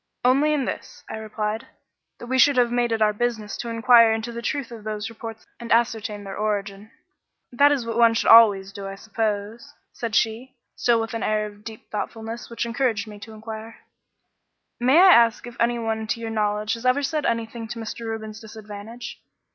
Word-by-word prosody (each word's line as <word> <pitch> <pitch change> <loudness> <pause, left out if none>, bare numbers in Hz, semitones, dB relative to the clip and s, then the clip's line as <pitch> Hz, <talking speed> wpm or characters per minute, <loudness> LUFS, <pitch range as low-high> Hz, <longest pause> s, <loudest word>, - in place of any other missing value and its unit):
"Only 275 +4 +4
in 290 -4 0
this," - - -6
I - - -4
replied; 215 0 -4 0.5
"that - - -9
we 260 +2 0
should 285 0 +5
have 240 -1 +3
made 240 -1 +1
it 220 -1 +2
our 210 0 +3
business 220 -2 -2
to 235 - -5
inquire 230 0 +6
into 225 +2 -2
the 235 0 -6
truth 275 -1 -3
of 225 -3 -9
those 215 +1 -4
reports 225 0 -9
and 235 -1 -7
ascertain 225 -3 +1
their 195 -1 -7
origin." 205 -1 -3 0.6
"That 285 +4 +5
is 270 -5 0
what 230 0 -2
one 230 -1 +5
should - - +3
always 205 -4 +7
do, 195 0 -7
I 195 - -6
suppose," 220 +5 -4 0.2
said 230 -3 -4
she, 235 +3 0 0.2
still 235 -1 +2
with 225 0 -4
an 230 - -3
air 215 0 0
of 205 0 -11
deep 220 -1 -11
thoughtfulness 225 +2 -5
which 235 0 -3
encouraged 235 -2 0
me 210 -1 -10
to 220 +2 -11
inquire 220 +1 -8 1.0
"May 255 +5 +4
I 370 +1 +8
ask 235 -1 +4
if 240 -1 -9
anyone 225 -2 0
to 230 - -2
your 225 -1 -5
knowledge 210 0 0
has 230 - -6
ever 255 +3 +2
said 300 +1 -1
anything 230 0 -3
to 235 +1 -6
Mr. 225 +1 -6
Reuben's 220 -1 -5
disadvantage?" 220 +1 -9
225 Hz, 195 wpm, -24 LUFS, 215-240 Hz, 1.0 s, I